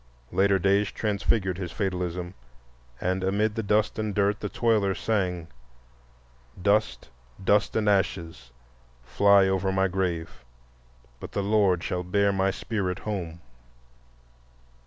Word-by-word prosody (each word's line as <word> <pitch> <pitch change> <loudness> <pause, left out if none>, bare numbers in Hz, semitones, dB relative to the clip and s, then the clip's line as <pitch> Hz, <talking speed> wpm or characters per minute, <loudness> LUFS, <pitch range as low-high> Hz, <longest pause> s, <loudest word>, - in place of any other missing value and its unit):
Later 100 0 +3
days 100 +2 +2
transfigured 100 -3 -1
his 90 -3 -5
fatalism, 90 -3 -3 0.7
and 95 +1 -1
amid 105 +3 +1
the 115 - -2
dust 105 +1 +1
and 110 -2 -2
dirt 100 0 +1
the 105 - -4
toiler 105 -5 +1
sang: 90 -5 -1 1.1
"Dust, 105 +3 +1 0.4
dust 105 +3 +2
and 110 -1 +1
ashes, 85 -9 -1 0.5
fly 100 +10 +4
over 95 0 0
my 95 0 +2
grave, 90 -7 -3 0.8
But - - -9
the 100 - -1
Lord 100 -4 +2
shall 90 - -2
bear 100 +3 +1
my 95 0 +1
spirit 95 -2 -3
home." 85 -6 -5
95 Hz, 120 wpm, -26 LUFS, 90-105 Hz, 1.1 s, fly